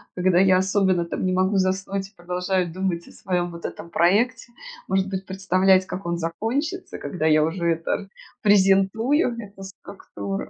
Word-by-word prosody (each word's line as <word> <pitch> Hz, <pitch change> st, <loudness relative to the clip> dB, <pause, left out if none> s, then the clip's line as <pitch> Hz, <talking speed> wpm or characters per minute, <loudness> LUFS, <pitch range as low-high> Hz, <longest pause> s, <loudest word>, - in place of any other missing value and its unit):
когда 180 Hz, 0 st, +3 dB
я, 190 Hz, -1 st, +5 dB
особенно, 190 Hz, -2 st, +1 dB
там, -, -, -4 dB
не 185 Hz, -, +1 dB
могу 185 Hz, +2 st, +1 dB
заснуть 190 Hz, +1 st, -1 dB
и 210 Hz, -, -32 dB
продолжаю 180 Hz, 0 st, -2 dB
думать 180 Hz, -1 st, -3 dB
о -, -, -14 dB
своем, 175 Hz, -2 st, -2 dB
вот 170 Hz, 0 st, -9 dB
этом 170 Hz, -, -7 dB
проекте, 215 Hz, +9 st, +2 dB, 0.4 s
может 190 Hz, 0 st, +1 dB
быть, 190 Hz, 0 st, -4 dB
представлять, 190 Hz, 0 st, +3 dB
как 190 Hz, 0 st, -7 dB
он 170 Hz, 0 st, -1 dB
закончится, 230 Hz, -, -3 dB
когда 160 Hz, -4 st, -2 dB
я 155 Hz, -1 st, +4 dB
уже 170 Hz, +2 st, -2 dB
это 165 Hz, +4 st, -3 dB, 0.3 s
презентую, 210 Hz, -, +3 dB
эту 200 Hz, -3 st, -10 dB
структуру. 195 Hz, 0 st, -7 dB
190 Hz, 160 wpm, -23 LUFS, 180-195 Hz, 0.4 s, я